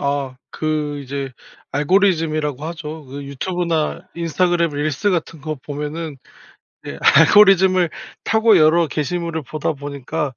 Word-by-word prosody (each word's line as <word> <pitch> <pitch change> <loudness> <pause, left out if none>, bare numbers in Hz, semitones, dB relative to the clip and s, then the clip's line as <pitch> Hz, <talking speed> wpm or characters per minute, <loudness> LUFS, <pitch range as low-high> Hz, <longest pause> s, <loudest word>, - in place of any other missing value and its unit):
아. 140 -2 -2
그 150 -2 -2
이제 140 0 -5 0.4
알고리즘이라고 155 -3 +1
하죠. 160 -2 -7
그 140 +2 -8
유튜브나 165 +3 -2
인스타그램 170 0 +1
릴스 145 +6 -1
같은 165 -3 -2
거 155 0 -4
보면은 150 +2 -6 0.7
예 - - -6
알고리즘을 185 +2 +6 0.4
타고 220 -2 +4
여러 160 +1 +4
게시물을 160 +2 -3
보다 155 +4 -2
보니까 140 0 -4
155 Hz, 290 characters per minute, -20 LUFS, 145-170 Hz, 0.7 s, 알고리즘을